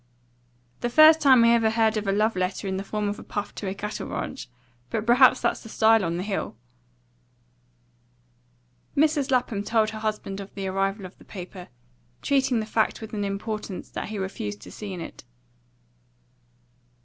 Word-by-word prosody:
"The 240 Hz, -, -1 dB
first 310 Hz, +4 st, +7 dB
time 260 Hz, -4 st, +6 dB
I 230 Hz, -, +6 dB
ever 230 Hz, -1 st, +4 dB
heard 220 Hz, 0 st, +2 dB
of 215 Hz, -1 st, -2 dB
a -, -, +3 dB
love 215 Hz, +2 st, +1 dB
letter 185 Hz, +2 st, -2 dB
in 190 Hz, 0 st, -2 dB
the 195 Hz, -, -3 dB
form 210 Hz, +1 st, -2 dB
of 205 Hz, +1 st, -3 dB
a -, -, -9 dB
puff 205 Hz, 0 st, -5 dB
to 200 Hz, -, -6 dB
a 190 Hz, -, -3 dB
cattle 210 Hz, +2 st, -5 dB
ranch. 265 Hz, -, -5 dB, 0.4 s
But 220 Hz, -, -2 dB
perhaps 255 Hz, +2 st, +6 dB
that's -, -, 0 dB
the 225 Hz, -, -11 dB
style 220 Hz, -1 st, +4 dB
on 170 Hz, -1 st, -1 dB
the 180 Hz, -, -3 dB
Hill." 195 Hz, -, -3 dB, 2.4 s
Mrs. 295 Hz, -2 st, +2 dB
Lapham 250 Hz, -5 st, +1 dB
told 220 Hz, 0 st, +1 dB
her 220 Hz, -, -7 dB
husband 210 Hz, -2 st, -3 dB
of 200 Hz, 0 st, -9 dB
the 195 Hz, -1 st, -4 dB
arrival 195 Hz, +1 st, -1 dB
of 185 Hz, -, -12 dB
the -, -, -15 dB
paper, 180 Hz, -1 st, -9 dB, 0.6 s
treating 270 Hz, -4 st, +2 dB
the -, -, -4 dB
fact 220 Hz, 0 st, 0 dB
with 220 Hz, -1 st, -9 dB
an 205 Hz, -1 st, -2 dB
importance 200 Hz, 0 st, -5 dB
that -, -, -5 dB
he 215 Hz, -, -5 dB
refused 105 Hz, -, -5 dB
to -, -, -11 dB
see 210 Hz, -2 st, -7 dB
in 180 Hz, -2 st, -6 dB
it. -, -, -9 dB
215 Hz, 185 wpm, -25 LUFS, 195-230 Hz, 2.4 s, first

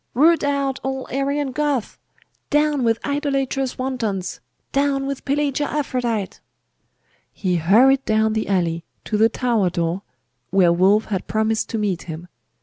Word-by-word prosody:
Root 320 Hz, +6 st, +4 dB
out 280 Hz, -2 st, 0 dB
all 265 Hz, 0 st, -3 dB
Arian 275 Hz, +1 st, -1 dB
Goths! 285 Hz, -4 st, -1 dB, 0.5 s
Down 295 Hz, -2 st, +2 dB
with 225 Hz, -1 st, +2 dB
idolatrous 275 Hz, -2 st, -1 dB
wantons! 225 Hz, -, -3 dB, 0.3 s
Down 275 Hz, -1 st, +1 dB
with 275 Hz, -1 st, -4 dB
Pelagia 285 Hz, 0 st, 0 dB
Aphrodite!' 245 Hz, -8 st, -2 dB, 0.9 s
He 180 Hz, -3 st, -1 dB
hurried 245 Hz, +11 st, +4 dB
down 220 Hz, 0 st, +2 dB
the 220 Hz, -, -1 dB
alley, 170 Hz, -4 st, 0 dB, 0.2 s
to 215 Hz, -, -2 dB
the 220 Hz, +2 st, +4 dB
tower 230 Hz, -5 st, +1 dB
door, 170 Hz, +1 st, -2 dB, 0.5 s
where 180 Hz, -3 st, +4 dB
Wulf 195 Hz, +5 st, +3 dB
had 195 Hz, -3 st, -3 dB
promised 220 Hz, 0 st, 0 dB
to 225 Hz, -, -2 dB
meet 200 Hz, -5 st, -1 dB
him. 165 Hz, +2 st, -7 dB
245 Hz, 140 wpm, -21 LUFS, 200-275 Hz, 0.9 s, Root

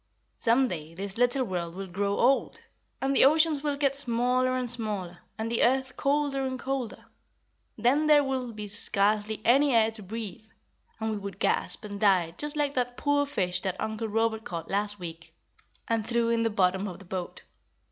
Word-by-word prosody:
"Some 245 Hz, +3 st, +3 dB
day 165 Hz, -4 st, -6 dB
this 195 Hz, +2 st, -5 dB
little 245 Hz, +2 st, +2 dB
world 175 Hz, -5 st, -4 dB
will 195 Hz, +1 st, -5 dB
grow 200 Hz, +2 st, -2 dB
old, 265 Hz, +2 st, +2 dB, 0.4 s
and 270 Hz, +1 st, 0 dB
the -, -, +6 dB
oceans 310 Hz, +1 st, +4 dB
will 290 Hz, -1 st, -1 dB
get 280 Hz, -1 st, +1 dB
smaller 255 Hz, 0 st, +1 dB
and 250 Hz, -1 st, -2 dB
smaller, 210 Hz, -7 st, +2 dB, 0.2 s
and 225 Hz, +1 st, -3 dB
the 235 Hz, -, 0 dB
earth 260 Hz, +1 st, +2 dB
colder 280 Hz, -1 st, 0 dB
and 260 Hz, -1 st, -2 dB
colder. 265 Hz, -3 st, -4 dB, 0.7 s
Then 265 Hz, +7 st, +2 dB
there 295 Hz, -1 st, +6 dB
will 260 Hz, -3 st, -3 dB
be 210 Hz, -1 st, -7 dB
scarcely 210 Hz, +1 st, +1 dB
any 275 Hz, +2 st, +4 dB
air 225 Hz, -1 st, +4 dB
to 220 Hz, -1 st, -1 dB
breathe, 215 Hz, +1 st, -7 dB, 0.5 s
and 220 Hz, 0 st, -2 dB
we 215 Hz, -, -2 dB
would 200 Hz, -2 st, -7 dB
gasp, 220 Hz, -, 0 dB
and 205 Hz, -1 st, -7 dB
die 185 Hz, -5 st, +3 dB
just 295 Hz, 0 st, -1 dB
like 290 Hz, -1 st, 0 dB
that 245 Hz, -1 st, -2 dB
poor 285 Hz, 0 st, +1 dB
fish 180 Hz, -11 st, -1 dB
that 190 Hz, -1 st, -3 dB
Uncle 220 Hz, +1 st, -3 dB
Robert 220 Hz, +1 st, 0 dB
caught 165 Hz, -5 st, -6 dB
last 205 Hz, +1 st, 0 dB
week 165 Hz, -1 st, -9 dB, 0.5 s
and 225 Hz, -1 st, 0 dB
threw 235 Hz, -1 st, +1 dB
in 230 Hz, 0 st, +1 dB
the 225 Hz, -, +1 dB
bottom 190 Hz, -1 st, +1 dB
of 180 Hz, -, -7 dB
the 195 Hz, -, -14 dB
boat. 180 Hz, 0 st, -6 dB
225 Hz, 190 wpm, -27 LUFS, 200-265 Hz, 0.7 s, the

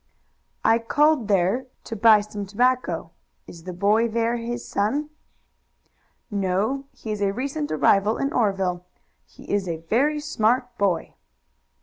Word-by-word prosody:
"I 225 Hz, +1 st, +5 dB
called 290 Hz, +1 st, +2 dB
there 200 Hz, +6 st, +1 dB, 0.2 s
to 225 Hz, -, -6 dB
buy 220 Hz, 0 st, +6 dB
some 205 Hz, -1 st, -7 dB
tobacco. 215 Hz, -6 st, 0 dB, 0.3 s
Is 165 Hz, -1 st, -13 dB
the 185 Hz, -, -5 dB
boy 205 Hz, +6 st, +2 dB
there 230 Hz, +1 st, 0 dB
his 240 Hz, +1 st, -5 dB
son?" 285 Hz, +9 st, -1 dB, 1.2 s
"No; 205 Hz, +7 st, -1 dB
he 220 Hz, -, -8 dB
is 210 Hz, -1 st, -3 dB
a 200 Hz, -1 st, +2 dB
recent 280 Hz, +7 st, -3 dB
arrival 200 Hz, +7 st, +3 dB
in 275 Hz, +1 st, -2 dB
Oreville. 195 Hz, -5 st, 0 dB, 0.4 s
He -, -, -16 dB
is 200 Hz, -2 st, -1 dB
a 165 Hz, -2 st, -2 dB
very 250 Hz, -, +1 dB
smart 250 Hz, -4 st, 0 dB
boy." 185 Hz, -5 st, 0 dB
220 Hz, 135 wpm, -24 LUFS, 195-250 Hz, 1.2 s, buy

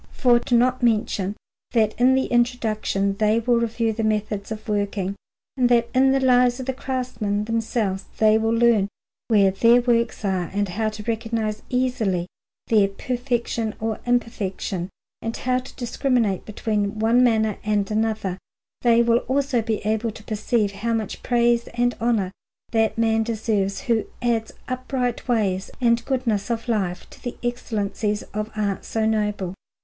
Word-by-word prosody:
For 240 Hz, -2 st, +3 dB
not 250 Hz, +1 st, +3 dB
to 245 Hz, -, +1 dB
mention 210 Hz, -3 st, +1 dB, 0.4 s
that 220 Hz, -3 st, +3 dB
in 260 Hz, +1 st, +6 dB
the 265 Hz, -, +2 dB
Introduction 220 Hz, -5 st, 0 dB
they 215 Hz, +1 st, +3 dB
will 235 Hz, 0 st, +2 dB
review 230 Hz, -1 st, 0 dB
the 225 Hz, +1 st, -3 dB
methods 210 Hz, -1 st, -1 dB
of 215 Hz, -1 st, -6 dB
working, 200 Hz, -2 st, -1 dB, 0.4 s
and 250 Hz, -2 st, +2 dB
that 235 Hz, -1 st, +3 dB
in 265 Hz, +1 st, +4 dB
the 270 Hz, -, +3 dB
Lives 250 Hz, -1 st, +4 dB
of 260 Hz, -, -4 dB
the 265 Hz, -, -1 dB
craftsmen 245 Hz, -6 st, -2 dB
themselves 220 Hz, -4 st, -1 dB
they 220 Hz, 0 st, +5 dB
will 225 Hz, 0 st, 0 dB
learn 230 Hz, -3 st, +4 dB, 0.4 s
where 200 Hz, -4 st, +4 dB
their 230 Hz, +5 st, +5 dB
works 235 Hz, -3 st, 0 dB
are, 185 Hz, -3 st, 0 dB
and 205 Hz, -1 st, 0 dB
how 215 Hz, +4 st, -1 dB
to 215 Hz, 0 st, -8 dB
recognize 225 Hz, -1 st, -2 dB
easily 245 Hz, -9 st, 0 dB, 0.4 s
their 210 Hz, -3 st, +4 dB
perfection 235 Hz, 0 st, -2 dB
or 220 Hz, 0 st, -2 dB
imperfection 205 Hz, -6 st, -1 dB, 0.3 s
and 225 Hz, 0 st, -3 dB
to 255 Hz, 0 st, 0 dB, 0.2 s
discriminate 240 Hz, -5 st, 0 dB
between 210 Hz, -1 st, -2 dB
one 230 Hz, +3 st, +4 dB
manner 220 Hz, -3 st, +2 dB
and 210 Hz, -1 st, 0 dB
another, 215 Hz, -4 st, -1 dB, 0.4 s
they 235 Hz, -1 st, +5 dB
will 235 Hz, 0 st, +3 dB
also 270 Hz, -2 st, +1 dB
be 220 Hz, -2 st, -2 dB
able 220 Hz, +2 st, 0 dB
to 215 Hz, 0 st, -10 dB
perceive 215 Hz, 0 st, 0 dB
how 220 Hz, +4 st, -2 dB
much 220 Hz, -3 st, -4 dB
praise 235 Hz, -1 st, +2 dB
and 245 Hz, 0 st, +2 dB
honour 225 Hz, -6 st, +1 dB, 0.4 s
that 225 Hz, -1 st, +1 dB
man 225 Hz, -1 st, +2 dB
deserves 215 Hz, -3 st, -1 dB
who 230 Hz, -4 st, +1 dB
adds 230 Hz, -2 st, 0 dB, 0.2 s
upright 255 Hz, -1 st, -2 dB
ways 200 Hz, -6 st, 0 dB
and 235 Hz, -2 st, +2 dB
goodness 240 Hz, -6 st, -1 dB
of 230 Hz, 0 st, -2 dB
life 190 Hz, -6 st, -1 dB
to -, -, -15 dB
the 245 Hz, -, -5 dB
excellencies 215 Hz, -3 st, -2 dB
of 215 Hz, +1 st, -3 dB
arts 205 Hz, -2 st, -2 dB
so 220 Hz, -1 st, 0 dB
noble. 210 Hz, -4 st, 0 dB
225 Hz, 155 wpm, -23 LUFS, 210-240 Hz, 0.4 s, in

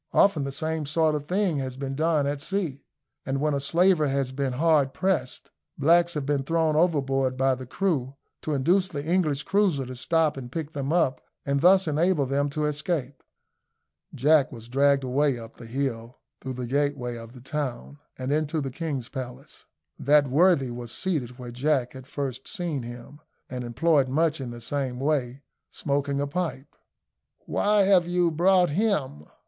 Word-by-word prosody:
Often 160 Hz, -8 st, +4 dB
the 140 Hz, -, -3 dB
same 155 Hz, +1 st, -2 dB
sort 155 Hz, +1 st, +2 dB
of 145 Hz, -1 st, -3 dB
thing 185 Hz, -4 st, +1 dB
has 130 Hz, -2 st, -4 dB
been 135 Hz, 0 st, -4 dB
done 155 Hz, 0 st, +1 dB
at 140 Hz, 0 st, -2 dB
sea, 170 Hz, -6 st, -3 dB, 0.4 s
and 135 Hz, 0 st, -2 dB
when 150 Hz, +1 st, +1 dB
a 140 Hz, -, 0 dB
slaver 170 Hz, +2 st, +3 dB
has 135 Hz, -1 st, -1 dB
been 135 Hz, -1 st, -2 dB
hard 145 Hz, -1 st, +2 dB
pressed, 185 Hz, -9 st, -1 dB, 0.3 s
blacks 170 Hz, +4 st, +3 dB
have 145 Hz, -2 st, -2 dB
been 145 Hz, -1 st, +1 dB
thrown 160 Hz, +2 st, +1 dB
overboard 135 Hz, -6 st, +1 dB
by 135 Hz, 0 st, +3 dB
the 130 Hz, 0 st, -7 dB
crew, 140 Hz, -6 st, -1 dB, 0.3 s
to 155 Hz, -, -2 dB
induce 180 Hz, +8 st, +2 dB
the 145 Hz, -5 st, -5 dB
English 155 Hz, -4 st, +1 dB
cruiser 190 Hz, -9 st, +1 dB
to 130 Hz, +1 st, -7 dB
stop 160 Hz, +3 st, +1 dB
and 125 Hz, -2 st, -7 dB
pick 160 Hz, +1 st, -5 dB
them 140 Hz, 0 st, -3 dB
up, 150 Hz, -7 st, +1 dB, 0.2 s
and 140 Hz, 0 st, 0 dB
thus 185 Hz, +1 st, +5 dB
enable 155 Hz, 0 st, +2 dB
them 140 Hz, +2 st, 0 dB
to 150 Hz, +2 st, -2 dB
escape. 150 Hz, -3 st, -2 dB, 0.9 s
Jack 145 Hz, +1 st, +4 dB
was 115 Hz, -3 st, -10 dB
dragged 140 Hz, +2 st, +3 dB
away 135 Hz, +1 st, +1 dB
up 115 Hz, -1 st, -11 dB
the 115 Hz, -, -10 dB
hill, 120 Hz, -2 st, -3 dB, 0.2 s
through 130 Hz, 0 st, -5 dB
the 125 Hz, 0 st, -5 dB
gateway 135 Hz, -2 st, -1 dB
of 115 Hz, 0 st, -10 dB
the 130 Hz, -, -12 dB
town, 140 Hz, 0 st, -5 dB, 0.2 s
and 130 Hz, +2 st, -2 dB
into 155 Hz, +1 st, 0 dB
the 135 Hz, -2 st, -3 dB
king's 140 Hz, -4 st, -4 dB
palace. 130 Hz, -3 st, -8 dB, 0.3 s
That 145 Hz, +1 st, +4 dB
worthy 140 Hz, -2 st, +3 dB
was 120 Hz, -1 st, -7 dB
seated 130 Hz, -10 st, -3 dB
where 125 Hz, -2 st, -8 dB
Jack 130 Hz, 0 st, 0 dB
had 130 Hz, -1 st, -11 dB
first 135 Hz, -2 st, -5 dB
seen 175 Hz, -, -3 dB
him, 120 Hz, +4 st, -10 dB, 0.3 s
and 125 Hz, -1 st, -4 dB
employed 140 Hz, +3 st, +2 dB
much 155 Hz, +1 st, +1 dB
in 130 Hz, -, -5 dB
the 120 Hz, 0 st, -8 dB
same 130 Hz, 0 st, -3 dB
way 135 Hz, -2 st, -1 dB, 0.3 s
smoking 140 Hz, -1 st, -1 dB
a 145 Hz, -, 0 dB
pipe. 145 Hz, -3 st, -4 dB, 0.7 s
"Why 210 Hz, 0 st, +2 dB
have 190 Hz, -3 st, +4 dB
you 175 Hz, -1 st, +2 dB
brought 180 Hz, +1 st, +3 dB
him?" 150 Hz, -, -1 dB
140 Hz, 175 wpm, -26 LUFS, 130-160 Hz, 0.9 s, thus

